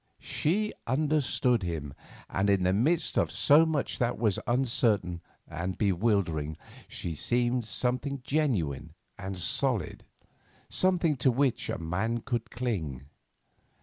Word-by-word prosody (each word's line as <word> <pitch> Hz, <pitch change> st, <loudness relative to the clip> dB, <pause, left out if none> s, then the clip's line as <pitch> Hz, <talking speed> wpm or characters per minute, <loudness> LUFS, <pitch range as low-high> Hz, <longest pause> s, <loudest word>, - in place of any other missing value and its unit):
She 210 Hz, +7 st, 0 dB
understood 130 Hz, -3 st, +2 dB
him, 80 Hz, -6 st, -4 dB, 0.3 s
and 95 Hz, +2 st, 0 dB
in 100 Hz, -2 st, +3 dB
the 90 Hz, +1 st, +3 dB
midst 155 Hz, -, +2 dB
of -, -, +1 dB
so 155 Hz, +3 st, +5 dB
much 155 Hz, -3 st, -1 dB
that 120 Hz, 0 st, 0 dB
was 110 Hz, -4 st, +1 dB
uncertain 115 Hz, -8 st, +1 dB, 0.3 s
and 90 Hz, +4 st, -4 dB
bewildering 90 Hz, -7 st, 0 dB, 0.3 s
she 85 Hz, -, -5 dB
seemed 120 Hz, -, 0 dB
something 125 Hz, +5 st, -1 dB
genuine 90 Hz, -, -1 dB, 0.3 s
and 95 Hz, -1 st, -5 dB
solid, 125 Hz, -, 0 dB, 0.7 s
something 175 Hz, -5 st, +2 dB
to 130 Hz, +2 st, +3 dB
which 130 Hz, 0 st, +1 dB
a -, -, -1 dB
man 95 Hz, +8 st, -2 dB
could 120 Hz, -2 st, -3 dB
cling. 80 Hz, -, -3 dB
115 Hz, 120 wpm, -29 LUFS, 90-135 Hz, 0.7 s, so